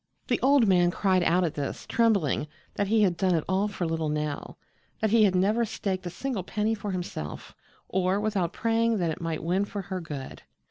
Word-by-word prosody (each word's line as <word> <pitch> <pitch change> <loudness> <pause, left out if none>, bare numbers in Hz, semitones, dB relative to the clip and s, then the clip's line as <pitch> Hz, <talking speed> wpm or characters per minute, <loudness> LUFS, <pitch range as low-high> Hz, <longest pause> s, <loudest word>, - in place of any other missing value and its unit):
The - - +2
old 270 -4 +5
man 175 -2 +4
cried 185 0 +2
out 175 +1 +3
at 165 - -1
this, 145 -2 -4
trembling, 200 - +2 0.3
that 200 - -1
he 215 +1 +3
had 180 -4 +2
done 185 0 +2
it 160 - 0
all 190 +3 +1
for 195 -4 -3
little 160 -1 -1
Nell; 150 -1 -3 0.4
that 220 - +1
he 225 -1 +6
had 190 -2 +2
never 210 +6 +2
staked 190 -4 -3
a - - -2
single 240 +4 -3
penny 210 +4 -1
for 210 -1 -5
himself, 175 - -5 0.3
or 190 +1 +1
without 205 -5 0
praying 230 0 +1
that 170 -4 0
it 155 - -6
might 165 -2 -3
win 180 +4 +1
for 200 -1 -5
her 185 - -2
good. 145 -5 -7
190 Hz, 205 wpm, -27 LUFS, 170-210 Hz, 0.4 s, he